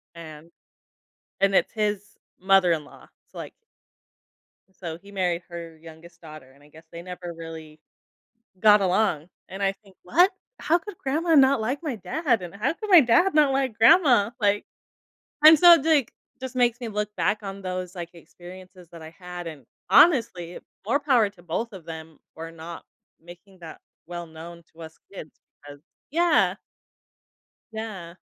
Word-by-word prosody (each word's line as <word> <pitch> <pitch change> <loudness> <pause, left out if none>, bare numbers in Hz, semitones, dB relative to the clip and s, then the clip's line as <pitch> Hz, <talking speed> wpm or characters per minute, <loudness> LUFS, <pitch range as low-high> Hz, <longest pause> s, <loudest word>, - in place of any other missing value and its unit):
and 160 0 -12 0.9
and 195 0 +2
it's - - +2
his 205 -2 -3 0.2
mother-in-law, 180 -5 +1 0.2
so, - - -14
like - - -8 1.3
So, 165 -1 -5
he 200 +1 -16
married 180 -3 -2
her 170 -1 -9
youngest 165 +2 -15
daughter, 155 -5 -13
and 140 +2 -23
I 150 - -20
guess 160 +2 -17
they 170 0 -9
never 180 -1 -8
really 160 -2 -10 0.8
got 210 -2 +6
along, 180 -4 0 0.2
and 195 +1 -7
I 195 0 +1
think, 195 -2 -23
"What? 350 - +3 0.3
How 325 - +2
could 395 0 -11
grandma 320 +5 0
not 270 -3 +5
like 255 +8 -3
my 280 -8 -4
dad? 240 - -1
And 175 +2 -9
how 230 +9 -1
could 430 +1 -8
my 360 -3 +9
dad 300 +9 +3
not 295 -3 +4
like 265 -4 -1
grandma? 240 - +5
Like" 205 -1 +1 0.8
and 310 -1 +9
so, 345 -4 +8
d 320 - -2
like, 285 -7 +2 0.3
just 260 -1 -8
makes 240 -1 +1
me 240 - -6
look 210 -1 -4
back 210 0 -1
on 195 0 -7
those, 185 0 -5
like, 170 -1 -7
experiences 180 +2 -14
that 165 - -11
I 160 - -10
had, 180 -1 -8
and, 150 -6 -10 0.2
honestly, 195 - +3 0.3
more 280 +5 +1
power 245 -8 +2
to 180 -4 -21
both 210 +7 -4
of 185 -4 -11
them 160 -1 -10 0.2
for 165 0 -8
not 165 +1 -10 0.3
making 175 +3 -16
that 165 -2 -11 0.3
well 175 -1 -7
known 170 +1 -12
to 165 - -16
us 160 0 -12 0.2
kids, 155 -5 -11 0.3
because 145 0 -12 0.3
yeah. 345 +2 +2 1.2
Yeah. 200 -6 -7
190 Hz, 165 wpm, -24 LUFS, 170-235 Hz, 1.3 s, my